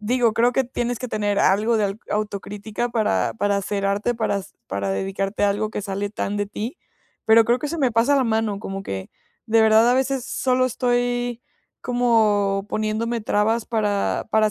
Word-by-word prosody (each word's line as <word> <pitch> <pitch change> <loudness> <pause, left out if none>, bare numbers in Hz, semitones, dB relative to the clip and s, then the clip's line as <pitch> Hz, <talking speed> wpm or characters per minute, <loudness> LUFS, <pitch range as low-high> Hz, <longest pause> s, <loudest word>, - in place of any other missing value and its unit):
digo, 235 +1 +2
creo 240 +2 +3
que 265 +1 +1
tienes 245 -1 -3
que 255 - -5
tener 205 -2 -1
algo 215 +4 +3
de 215 - +1
al 200 +2 -3
autocrítica 210 +2 -3
para 115 - +1
para 200 - 0
hacer 200 0 -2
arte, 205 +5 0
para 210 -3 -1 0.3
para 100 0 -2
dedicarte 195 - -1
a 200 - +3
algo 210 +2 -2
que 210 - -4
sale 200 0 -3
tan 205 -1 -3
de 205 - -1
ti, 220 - -6 0.5
pero 225 0 +6
creo 240 +2 +2
que 295 - -3
se 335 +3 -4
me 260 -5 +2
pasa 235 +6 +3
la 270 - +2
mano, 220 -3 0
como 195 -2 -5
que, 95 - -6 0.4
de 225 0 +4
verdad, 220 +1 +5
a - - +4
veces 265 -1 0
solo 255 -1 +1
estoy, 245 -1 -1 0.4
como, 215 -5 +2
poniéndome 220 +2 -1
trabas 215 +2 0
para 210 -3 0
para 215 -1 +3
220 Hz, 185 wpm, -22 LUFS, 205-240 Hz, 0.5 s, pero